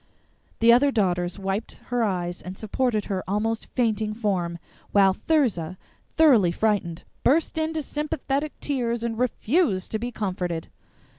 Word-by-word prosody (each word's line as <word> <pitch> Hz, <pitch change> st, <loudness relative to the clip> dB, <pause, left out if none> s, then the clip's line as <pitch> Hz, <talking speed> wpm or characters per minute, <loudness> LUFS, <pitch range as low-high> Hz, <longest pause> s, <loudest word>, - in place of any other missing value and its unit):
The 230 Hz, +1 st, +7 dB
other 270 Hz, +4 st, +5 dB
Daughters 180 Hz, -5 st, 0 dB
wiped 195 Hz, +2 st, -3 dB
her 245 Hz, -1 st, +2 dB
eyes 175 Hz, -4 st, -2 dB
and 185 Hz, +1 st, -8 dB
supported 220 Hz, 0 st, -1 dB
her 190 Hz, -2 st, -2 dB
almost 220 Hz, +3 st, -1 dB
fainting 220 Hz, -3 st, 0 dB
form, 185 Hz, -6 st, -1 dB, 0.3 s
while 195 Hz, -2 st, +5 dB
Thirza, 195 Hz, -, 0 dB, 0.4 s
thoroughly 250 Hz, -, +6 dB
frightened, 185 Hz, -4 st, 0 dB, 0.2 s
burst 315 Hz, +6 st, +2 dB
into 315 Hz, -1 st, -1 dB
sympathetic 295 Hz, 0 st, -3 dB
tears, 240 Hz, -5 st, -1 dB
and 230 Hz, -1 st, -2 dB
refused 250 Hz, -, +1 dB
to 220 Hz, -, -1 dB
be 240 Hz, +2 st, -3 dB
comforted. 180 Hz, -6 st, -3 dB
220 Hz, 135 wpm, -25 LUFS, 185-250 Hz, 0.4 s, The